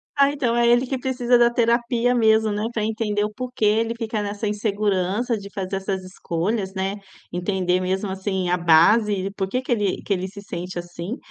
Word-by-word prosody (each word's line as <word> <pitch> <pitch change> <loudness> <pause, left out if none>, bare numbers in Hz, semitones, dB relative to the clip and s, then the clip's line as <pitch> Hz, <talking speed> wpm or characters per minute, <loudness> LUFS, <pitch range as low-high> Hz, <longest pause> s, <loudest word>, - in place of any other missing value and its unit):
Ah, 280 0 +4
então 250 -5 0
é 235 0 +3
ele 240 +2 +4
que 265 +1 -2
precisa 250 -1 +2
da 240 0 +5
terapia 235 +1 +1
mesmo, 220 -2 +3
né, 210 +1 -2
para 215 - -1
entender 215 -1 -1
o 210 0 -3
porquê 250 0 -5
ele 225 +2 +2
fica 225 -2 -2
nessa 205 +1 -3
insegurança 210 +1 0
de 200 0 -9
fazer 195 0 -4
essas 190 -1 -3
escolhas, 190 +2 -3
né. 190 +1 -2 0.4
Entender 180 0 0
mesmo, 190 +2 -1
assim, 190 -1 -2
a 180 - +2
base 175 +6 +5
e 195 0 -2
por 195 -1 -3
que 250 +6 -1
que 255 - -6
ele 205 -5 0
que - - -8
ele 185 0 0
se 200 +1 -10
sente 180 -2 -6
assim 175 +6 -5
210 Hz, 200 wpm, -23 LUFS, 190-235 Hz, 0.4 s, da